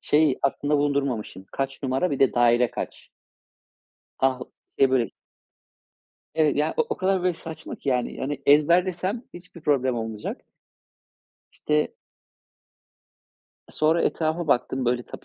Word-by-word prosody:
Şeyi 150 -3 +3
aklımda 145 +1 +1
bulundurmamışım: 140 -9 -1
Kaç 135 0 -3
numara, 135 +6 0
bir 140 - -2
de 135 - +3
daire 120 0 +4
kaç? - - -7 1.1
Ah, 130 -1 +2
o - - -9 0.3
şey, 135 -1 +5
böyle 125 -3 +2 1.2
Evet, 155 -3 +2
ya, 150 +1 +1
o - - +4
o - - -2
kadar, 190 -1 +1
böyle, 185 - +2
saçma 160 0 -8
ki - - -7
yani, 125 -2 0
hani, 140 0 -3
ezberlesem 180 - +3
hiçbir 175 -1 -12
problem 130 -4 +1
olmayacak. 110 -2 -4 1.1
İşte 150 0 0 1.7
sonra 160 +2 +2
etrafa 160 +1 0
baktım, 130 0 +1
böyle, 120 0 +1
tabii, - - -11
140 Hz, 130 wpm, -25 LUFS, 130-160 Hz, 1.7 s, şey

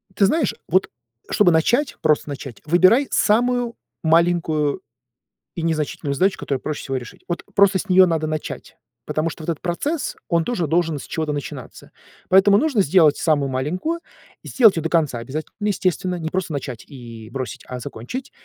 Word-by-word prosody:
Ты 200 - +4
знаешь, 290 +3 +1
вот, 185 +2 +2 0.4
чтобы 195 -4 +4
начать, 240 - +2
просто 150 -1 +2
начать, 135 -3 -7
выбирай 185 - +4
самую 240 +2 +2 0.3
маленькую 165 -1 +2 0.7
и 170 - -4
незначительную 155 -2 -2
задачу, 190 +6 +2
которую 135 -2 -3
проще 155 -1 -4
всего 135 -1 -2
решить. 120 -2 -9
Вот, 175 - -3
просто 200 -1 +5
с 210 - -5
нее 185 0 +7
надо 160 -2 0
начать, 155 0 -5 0.3
потому 155 +2 -1
что 160 - -9
вот 155 - -4
этот 160 - -6
процесс- 275 - -2
он 170 -2 +2
тоже 215 -9 -1
должен 165 0 +1
с - - -8
чего-то 155 -2 -2
начинаться. 145 -2 -8 0.4
Поэтому 195 +2 +6
нужно 280 -5 +2
сделать 155 -3 +4
самую 145 -4 +1
маленькую, 175 - -2 0.4
и - - -11
сделать 220 -8 +5
ее - - 0
до 165 - -2
конца 155 -8 +1
обязать 135 +7 -5
естественно. 185 -3 0
Не 160 -2 -4
просто 185 -2 -2
начать 130 -5 -5
и 115 -5 -11
бросить, 130 +1 -6
а 125 - -6
закончить. 250 - -7
165 Hz, 170 wpm, -21 LUFS, 150-195 Hz, 0.7 s, нее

